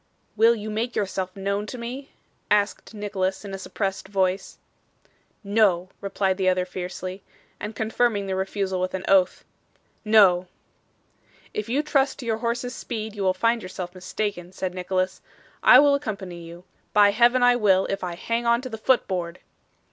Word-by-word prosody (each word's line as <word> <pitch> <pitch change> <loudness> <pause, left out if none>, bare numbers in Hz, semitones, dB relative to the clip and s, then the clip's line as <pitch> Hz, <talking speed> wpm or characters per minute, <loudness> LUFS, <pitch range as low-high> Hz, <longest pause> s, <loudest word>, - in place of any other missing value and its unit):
'Will 225 +2 +5
you 215 -1 -6
make 230 +3 -2
yourself 190 -2 -2
known 200 +1 -2
to 250 - -6
me?' 250 +4 -6 0.4
asked 205 +1 0
Nicholas 200 -2 -2
in 195 - -7
a 195 - -5
suppressed 195 0 -3
voice. 190 -1 -1 0.9
'No,' 200 -4 +2
replied 195 -1 0
the 190 -1 +2
other 185 0 +1
fiercely, 185 +1 -6 0.4
and 210 +1 -6
confirming 220 -2 0
the 190 -1 -2
refusal 190 -1 -2
with 185 +1 -2
an 190 - -5
oath. 190 -2 +3 0.6
'No.' 195 -5 +5 1.1
'If 210 +1 -4
you 275 +5 +1
trust 275 -2 +1
to 255 - -8
your 225 -1 0
horse's 240 +1 -2
speed, 220 -4 -5
you 205 - -5
will 185 -1 +2
find 230 +4 +1
yourself 185 -1 -6
mistaken,' 185 -1 -4
said 185 -1 -3
Nicholas. 185 0 -2 0.4
'I - - +8
will 285 -1 +5
accompany 200 -10 -4
you. 170 +1 -11 0.3
By 205 -1 +6
Heaven 240 +4 +4
I 245 0 +6
will, 195 -5 +3
if 195 -1 -3
I 175 -1 -3
hang 230 +6 -2
on 235 +1 +3
to 255 - -6
the 220 -2 -7
foot 255 +3 +2
board. 175 -2 -3
200 Hz, 170 wpm, -24 LUFS, 185-230 Hz, 1.1 s, I